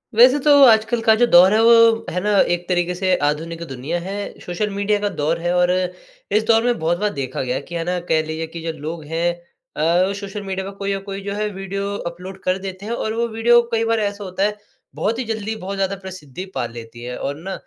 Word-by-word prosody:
वैसे 250 Hz, +4 st, +7 dB
तो 295 Hz, -, +6 dB
आजकल 225 Hz, 0 st, +4 dB
का 225 Hz, -1 st, +5 dB
जो 240 Hz, +2 st, +4 dB
दौर 185 Hz, +3 st, +8 dB
है 220 Hz, -, +4 dB
वो 230 Hz, -1 st, +6 dB
है 180 Hz, -, -1 dB
ना 210 Hz, -, 0 dB, 0.2 s
एक 175 Hz, 0 st, -4 dB
तरीके 175 Hz, 0 st, +1 dB
से 185 Hz, 0 st, +1 dB
आधुनिक 165 Hz, +3 st, -1 dB
दुनिया 135 Hz, +7 st, -3 dB
है, 200 Hz, +3 st, -6 dB
सोशल 195 Hz, +4 st, -2 dB
मीडिया 200 Hz, +1 st, 0 dB
का 205 Hz, 0 st, -1 dB
दौर 160 Hz, -3 st, -1 dB
है 175 Hz, +1 st, -1 dB
और 180 Hz, 0 st, +3 dB, 0.7 s
इस 215 Hz, -, +1 dB
दौर 225 Hz, 0 st, +3 dB
में 245 Hz, -1 st, +1 dB
बहुत 165 Hz, +2 st, 0 dB
बार 210 Hz, 0 st, +1 dB
देखा 135 Hz, -2 st, -4 dB
गया 125 Hz, -1 st, -2 dB
है 135 Hz, -, -2 dB
कि 170 Hz, -, -9 dB
है 165 Hz, -, -1 dB
ना 180 Hz, 0 st, -1 dB
कह 160 Hz, -1 st, +3 dB
लीजिए 160 Hz, +1 st, -4 dB
कि 170 Hz, -, -6 dB
जो 165 Hz, 0 st, -3 dB
लोग 155 Hz, +2 st, -6 dB
हैं 165 Hz, +3 st, 0 dB, 0.4 s
अ, 175 Hz, +5 st, +2 dB
सोशल 200 Hz, 0 st, -6 dB
मीडिया 190 Hz, -1 st, -4 dB
पर 200 Hz, -, -11 dB
कोई 200 Hz, 0 st, -2 dB
ना 195 Hz, -, -2 dB
कोई 195 Hz, 0 st, -7 dB
जो 200 Hz, 0 st, -3 dB
है 210 Hz, +1 st, -1 dB
वीडियो 195 Hz, +1 st, -4 dB, 0.2 s
अपलोड 185 Hz, +2 st, -10 dB
कर 185 Hz, 0 st, +1 dB
देते 190 Hz, 0 st, -7 dB
हैं 225 Hz, -, -3 dB
और 220 Hz, -2 st, -2 dB
वो 235 Hz, +1 st, 0 dB
वीडियो 235 Hz, +1 st, +4 dB
कई 225 Hz, 0 st, +2 dB
बार 225 Hz, -, +2 dB
ऐसा 205 Hz, -1 st, -2 dB
होता 185 Hz, 0 st, -2 dB
है 210 Hz, +1 st, 0 dB, 0.4 s
बहुत 225 Hz, +3 st, -1 dB
ही -, -, -1 dB
ज़ल्दी 220 Hz, 0 st, -3 dB
बहुत 195 Hz, -1 st, -5 dB
ज़्यादा 195 Hz, 0 st, -1 dB
प्रसिद्धि 185 Hz, -4 st, -8 dB
पा -, -, -1 dB
लेती 115 Hz, 0 st, -10 dB
है। 125 Hz, 0 st, -5 dB
और 140 Hz, -, -3 dB
ना 190 Hz, +1 st, -4 dB
190 Hz, 245 wpm, -20 LUFS, 170-210 Hz, 0.7 s, दौर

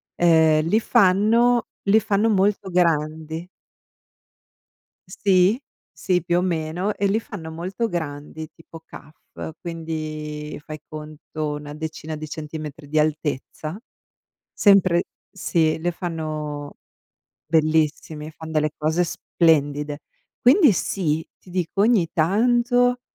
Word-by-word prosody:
Ehm, 160 Hz, -2 st, +4 dB
li 215 Hz, +6 st, +3 dB
fanno 230 Hz, +3 st, +3 dB, 0.2 s
li 205 Hz, +2 st, +5 dB
fanno 210 Hz, +2 st, +1 dB
molto 200 Hz, 0 st, +1 dB
grandi. 160 Hz, -1 st, 0 dB, 1.6 s
Sì, 190 Hz, +3 st, +3 dB, 0.3 s
sì, 180 Hz, -2 st, 0 dB
più 175 Hz, +1 st, +1 dB
o -, -, +3 dB
meno, 175 Hz, +3 st, -1 dB
e 200 Hz, -, 0 dB
li 205 Hz, +3 st, +2 dB
fanno 170 Hz, -8 st, -8 dB
molto 185 Hz, +8 st, -3 dB
grandi 155 Hz, -2 st, -5 dB
tipo 165 Hz, 0 st, -13 dB
kaff, 155 Hz, +1 st, -10 dB
quindi 155 Hz, -2 st, -5 dB
fai 155 Hz, -1 st, -8 dB
conto 155 Hz, 0 st, -6 dB
una 150 Hz, 0 st, -7 dB
decina 155 Hz, 0 st, -6 dB
di 155 Hz, 0 st, -6 dB
centimetri 150 Hz, -1 st, -7 dB
di 155 Hz, +1 st, +1 dB
altezza. 155 Hz, +2 st, -2 dB, 0.7 s
Sempre 190 Hz, -4 st, +4 dB, 0.3 s
sì, 160 Hz, -4 st, +1 dB
li 175 Hz, +2 st, 0 dB
fanno 155 Hz, -4 st, -5 dB, 0.7 s
bellissimi, 155 Hz, -1 st, +1 dB
fan 160 Hz, 0 st, -10 dB
delle 155 Hz, -1 st, +1 dB
cose 160 Hz, +3 st, +1 dB
splendide. 150 Hz, -3 st, +1 dB, 0.4 s
Quindi 280 Hz, -, +6 dB
sì, 160 Hz, -4 st, -1 dB
ti -, -, -21 dB
dico 180 Hz, +1 st, -2 dB
ogni 215 Hz, -7 st, +3 dB
tanto, 240 Hz, +7 st, +2 dB
160 Hz, 110 wpm, -23 LUFS, 155-190 Hz, 1.6 s, Quindi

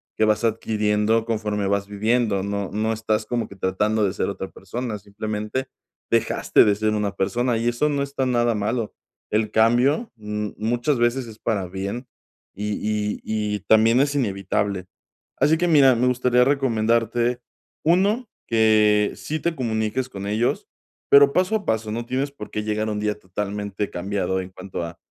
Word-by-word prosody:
que 110 Hz, -, +2 dB
vas 110 Hz, +1 st, +1 dB
adquiriendo 110 Hz, 0 st, +1 dB
conforme 105 Hz, -3 st, -1 dB
vas 100 Hz, 0 st, 0 dB
viviendo. 105 Hz, 0 st, +1 dB
No 100 Hz, -1 st, -3 dB
no 110 Hz, +2 st, 0 dB
estás 110 Hz, -1 st, -1 dB
como 120 Hz, -2 st, -1 dB
que 100 Hz, -, -12 dB
tratando 105 Hz, +3 st, 0 dB
de 95 Hz, -2 st, +1 dB
ser -, -, -1 dB
otra 95 Hz, -1 st, -5 dB
persona, 110 Hz, +3 st, -5 dB
simplemente 105 Hz, +5 st, -4 dB, 0.4 s
dejaste -, -, +3 dB
de 105 Hz, -, +4 dB
ser 110 Hz, +1 st, 0 dB
una 105 Hz, -2 st, -1 dB
persona, 115 Hz, +5 st, 0 dB
y 115 Hz, +1 st, -1 dB
eso 120 Hz, +5 st, +1 dB
no 145 Hz, -1 st, 0 dB
está 140 Hz, -1 st, -2 dB
nada 120 Hz, -2 st, +2 dB
malo. 110 Hz, +2 st, -2 dB, 0.4 s
El 105 Hz, 0 st, 0 dB
cambio, 125 Hz, -, +3 dB
mm, 105 Hz, -1 st, -4 dB
muchas 120 Hz, +6 st, 0 dB
veces 120 Hz, +1 st, +1 dB
es 110 Hz, -1 st, -11 dB
para 100 Hz, -5 st, -1 dB
bien, 100 Hz, +7 st, -5 dB, 0.5 s
y 105 Hz, +2 st, -3 dB
y 105 Hz, -1 st, -1 dB
y 105 Hz, -1 st, -2 dB
también 110 Hz, +2 st, +5 dB
es 140 Hz, +1 st, +2 dB
inevitable. 100 Hz, -5 st, -1 dB, 0.5 s
Así 150 Hz, +4 st, +3 dB
que 175 Hz, +2 st, +1 dB
mira, 140 Hz, -5 st, +6 dB
me 125 Hz, +2 st, +2 dB
gustaría 125 Hz, 0 st, +3 dB
recomendarte, 120 Hz, -2 st, +1 dB, 0.4 s
1, 200 Hz, +8 st, +2 dB, 0.2 s
que 105 Hz, -2 st, +4 dB
sí 155 Hz, +1 st, -4 dB
te 170 Hz, -, 0 dB
comuniques 115 Hz, 0 st, -1 dB
con 100 Hz, -4 st, -6 dB
ellos, 110 Hz, +4 st, 0 dB, 0.4 s
pero 140 Hz, 0 st, +7 dB
paso 185 Hz, +4 st, +2 dB
a 210 Hz, -, -2 dB
paso, 110 Hz, -1 st, -1 dB
no 115 Hz, +2 st, -3 dB
tienes 135 Hz, +3 st, -2 dB
por 120 Hz, -7 st, -9 dB
qué 105 Hz, -, -3 dB
llegar 110 Hz, 0 st, -1 dB
un 105 Hz, -1 st, -2 dB
día 105 Hz, 0 st, -1 dB
totalmente 100 Hz, +1 st, -4 dB
cambiado 95 Hz, +1 st, -2 dB
en 90 Hz, -, -8 dB
cuanto 95 Hz, -1 st, -6 dB
a 85 Hz, -, -9 dB
110 Hz, 170 wpm, -23 LUFS, 105-125 Hz, 0.5 s, pero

